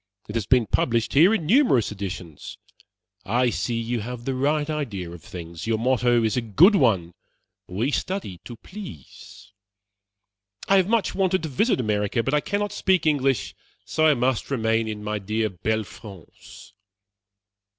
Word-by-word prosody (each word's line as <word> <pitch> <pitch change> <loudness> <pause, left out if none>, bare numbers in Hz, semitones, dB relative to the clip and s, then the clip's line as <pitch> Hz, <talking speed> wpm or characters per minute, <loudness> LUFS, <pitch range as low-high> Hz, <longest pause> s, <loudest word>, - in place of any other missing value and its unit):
It 105 - -7
has 110 -4 -2
been 125 -3 +4
published 115 +2 0
here 165 +8 +6
in 220 -8 0
numerous 205 - +3
editions. 95 -6 -7 0.7
I 120 +4 +1
see 115 0 -2
you 115 +1 -2
have 120 +2 -7
the 135 - -1
right 145 +3 0
idea 115 - -4
of 85 -1 -10
things. 85 +1 -8
Your 115 -1 +1
motto 120 0 +2
is 110 -2 +1
a 125 - +1
good 140 - +5
one 100 - +2 0.5
'we 110 +10 -1
study 185 - -3
to 120 - -8
please.' 110 - -12 1.2
I 195 - +5
have 185 -1 +3
much 230 -2 +1
wanted 185 -2 +1
to 160 - -3
visit 180 - +1
America; 105 0 0
but 135 - -2
I 150 - +4
cannot 205 +3 -2
speak 190 -4 +1
English, 135 -5 +1 0.3
so 155 0 +2
I 150 - +5
must 125 -1 0
remain 115 -3 0
in 105 -1 -5
my 105 0 -2
dear 110 +2 -1
belle 110 +4 -1
France." 100 -5 -14
120 Hz, 160 wpm, -24 LUFS, 105-150 Hz, 1.2 s, here